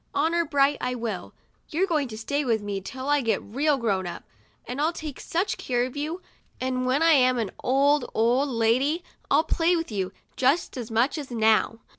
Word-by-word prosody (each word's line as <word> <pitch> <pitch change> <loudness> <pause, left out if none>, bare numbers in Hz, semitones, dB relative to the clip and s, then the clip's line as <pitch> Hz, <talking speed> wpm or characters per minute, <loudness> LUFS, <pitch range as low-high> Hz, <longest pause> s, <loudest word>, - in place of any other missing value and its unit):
Honor 330 +4 +2
bright, 285 -1 +2
I 250 0 -1
will. 225 -6 -5 0.3
You're 345 +5 +1
going 310 -7 0
to 215 -2 -8
stay 285 +6 -1
with 230 -4 +1
me 200 -1 -3
till 260 +7 -7
I 290 0 +3
get 225 -5 +1
real 280 +7 +1
grown 200 -7 0
up. 170 - -7 0.4
I'll 290 +6 0
take 310 -4 -7
such 360 +5 -2
care 245 -1 0
of 255 - -8
you, 315 +5 -4 0.4
and 255 0 -1
when 270 +5 +2
I 330 - +6
am 255 -4 +4
an 220 -5 -2
old, 275 +1 +3
old 245 +6 +2
lady, 255 +8 +1 0.3
I'll 315 - +4
play 335 +1 +2
with 330 -6 -3
you, 190 -3 -2 0.2
just 275 +7 +1
as 245 -3 -5
much 235 +7 +1
as 285 - -7
now. 225 -1 +2
260 Hz, 195 wpm, -26 LUFS, 230-295 Hz, 0.4 s, I